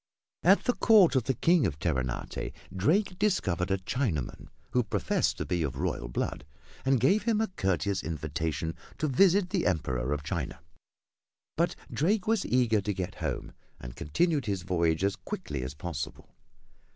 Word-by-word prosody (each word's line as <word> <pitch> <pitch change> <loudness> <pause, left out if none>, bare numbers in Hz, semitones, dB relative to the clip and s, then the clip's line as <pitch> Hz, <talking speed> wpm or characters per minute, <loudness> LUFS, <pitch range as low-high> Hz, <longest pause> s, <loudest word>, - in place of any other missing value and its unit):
At 190 +4 +5
the 245 - +2
court 210 - +5
of 130 -4 +2
the 135 - 0
King 160 - +4
of 75 -5 -4
Terenate 65 -6 -2 0.2
Drake 180 - +1
discovered 95 - +1
a 95 - +2
Chinaman, 95 - -2 0.2
who 125 - +3
professed 110 - 0
to - - -3
be 90 -1 -1
of 70 -5 -2
royal - - -2
blood, 70 +3 -3 0.4
and 135 0 +3
gave 170 - +4
him 225 -2 +2
a 220 - 0
courteous 95 - 0
invitation 80 +1 -3 0.2
to 155 - 0
visit 185 +6 +4
the 185 - +1
Emperor 65 -8 -1
of 75 0 -1
China. 75 -2 -3 1.0
But - - +1 0.2
Drake 195 +6 +1
was 220 -2 +1
eager 120 -4 +3
to 105 +1 -2
get 90 -1 -3
home - - -3 0.3
and - - -9
continued 145 - 0
his 100 -3 -1
voyage 85 -2 +1
as 100 0 +2
quickly 70 -6 -5
as 65 +2 -5
possible. 75 -2 -6
95 Hz, 165 wpm, -29 LUFS, -, 1.0 s, At